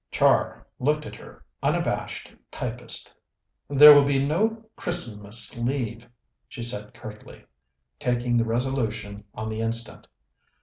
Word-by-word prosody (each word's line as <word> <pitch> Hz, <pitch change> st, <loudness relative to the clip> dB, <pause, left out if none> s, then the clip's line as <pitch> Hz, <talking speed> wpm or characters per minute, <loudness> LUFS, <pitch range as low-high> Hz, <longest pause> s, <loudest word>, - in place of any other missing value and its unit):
Char -, -, +2 dB
looked 150 Hz, +3 st, 0 dB
at -, -, -8 dB
her -, -, -15 dB, 0.2 s
unabashed -, -, -2 dB, 0.2 s
typist. -, -, -6 dB, 0.6 s
"There 150 Hz, +1 st, +10 dB
will 145 Hz, -1 st, +7 dB
be 140 Hz, 0 st, +1 dB
no 220 Hz, +9 st, 0 dB
Christmas 115 Hz, -10 st, -1 dB
leave," 120 Hz, -1 st, -3 dB, 0.4 s
she 120 Hz, -, -7 dB
said 105 Hz, -3 st, -5 dB
curtly, 105 Hz, -1 st, -11 dB, 0.5 s
taking 120 Hz, -1 st, 0 dB
the 115 Hz, -, +2 dB
resolution 115 Hz, -4 st, -2 dB
on 110 Hz, +1 st, -4 dB
the 110 Hz, 0 st, -3 dB
instant. 115 Hz, 0 st, -3 dB
120 Hz, 120 wpm, -25 LUFS, 110-140 Hz, 0.6 s, There